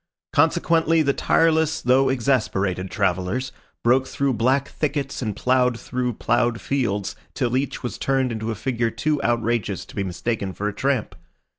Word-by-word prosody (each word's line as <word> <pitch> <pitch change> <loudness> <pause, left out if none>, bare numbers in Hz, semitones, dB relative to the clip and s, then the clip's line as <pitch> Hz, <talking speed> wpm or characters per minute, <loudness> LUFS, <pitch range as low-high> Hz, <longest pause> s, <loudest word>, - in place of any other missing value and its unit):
Consequently 165 +1 +3
the 140 -1 +2
tireless 160 0 +2
though 130 +2 +3
exasperated 105 -8 0
travellers 95 +7 -1 0.3
broke 130 +2 +3
through 140 0 0
black 130 +5 +2
thickets 145 -3 -3
and 110 -5 -2
ploughed 125 0 +2
through 125 -1 -2
ploughed 120 +1 +1
fields 105 -8 -1 0.2
till 125 -1 0
each 135 +1 -2
was 120 - -4
turned 135 -2 +1
into 110 0 -3
a 115 - -2
figure 120 0 -1
too 150 +5 -1
outrageous 115 -5 0
to - - -14
be 100 - -1
mistaken 95 +2 -3
for 105 - -3
a 105 - -2
tramp. 130 -3 -1
125 Hz, 155 wpm, -23 LUFS, 110-140 Hz, 0.3 s, Consequently